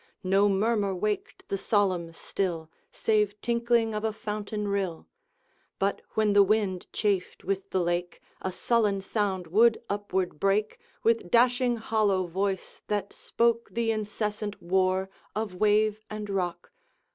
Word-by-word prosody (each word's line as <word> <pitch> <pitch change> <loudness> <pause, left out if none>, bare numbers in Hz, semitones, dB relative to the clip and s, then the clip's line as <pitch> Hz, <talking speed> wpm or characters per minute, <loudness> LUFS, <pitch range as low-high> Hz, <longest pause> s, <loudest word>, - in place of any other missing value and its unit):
No 195 +2 +4
murmur 200 0 +1
waked 210 +3 -3
the 195 - -1
solemn 185 -5 +1
still, 165 -2 -3 0.2
Save 210 -2 +1
tinkling 235 -1 +1
of 210 0 -3
a 220 - +1
fountain 210 -1 -4
rill; 195 -5 -2 0.7
But 200 +1 0
when 215 -1 +3
the 205 - +7
wind 200 -2 +1
chafed 200 -4 -1
with 195 0 -2
the 190 - 0
lake, 175 0 -1 0.2
A 190 - -2
sullen 210 0 +1
sound 195 -2 -1
would 220 +7 +4
upward 190 -5 -2
break, 205 +2 +1 0.2
With 230 -5 +2
dashing 245 +2 +4
hollow 215 -4 +1
voice, 190 +2 -3
that 205 -1 -2
spoke 235 0 0
The 230 -1 +1
incessant 210 -1 -3
war 185 +1 +1 0.2
of 215 -3 -2
wave 215 +2 +2
and 215 -1 -5
rock. 175 -3 -2
205 Hz, 135 wpm, -28 LUFS, 190-215 Hz, 0.7 s, the